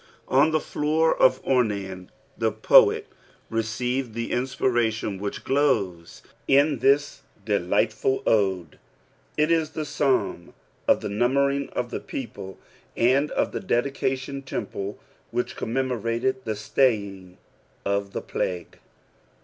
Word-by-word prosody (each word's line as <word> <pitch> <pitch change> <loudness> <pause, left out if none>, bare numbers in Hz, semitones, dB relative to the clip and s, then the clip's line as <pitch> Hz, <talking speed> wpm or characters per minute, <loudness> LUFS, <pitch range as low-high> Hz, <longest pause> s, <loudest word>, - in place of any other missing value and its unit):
On 140 +4 +4
Ote 155 - +1
floor 155 +2 +1
of 130 0 +3
Ornan, 100 -7 0 0.3
Ihe 110 -1 0
poet - - +6 0.5
receiiwJ 120 +3 -1
ihe 115 0 -3
inaptration 120 -5 0
which 100 0 -5
glores 110 - 0 0.2
in 140 0 +4
this 140 +3 +2 0.2
ddight 105 +2 +1
fut 130 +4 -1
ode. 95 -7 +1 0.6
Riathe 155 0 +1
Fsnim 145 - -1 0.3
of - - +3
Ihe 105 - -3
nutria 135 +6 +2
ing - - -6
qf 120 - -4
the - - -3
people, 105 -7 -7 0.4
and 135 +5 +3
of - - 0
the - - -3
dedioo&on 135 -2 -1
temple 100 -6 -5 0.3
which 120 +1 -2
cotamemorvird 125 0 -1
the 110 - -2
staying 100 -5 0 0.5
of 100 0 -1
the - - -3
plague. 90 -2 -4
120 Hz, 115 wpm, -25 LUFS, 100-135 Hz, 0.6 s, poet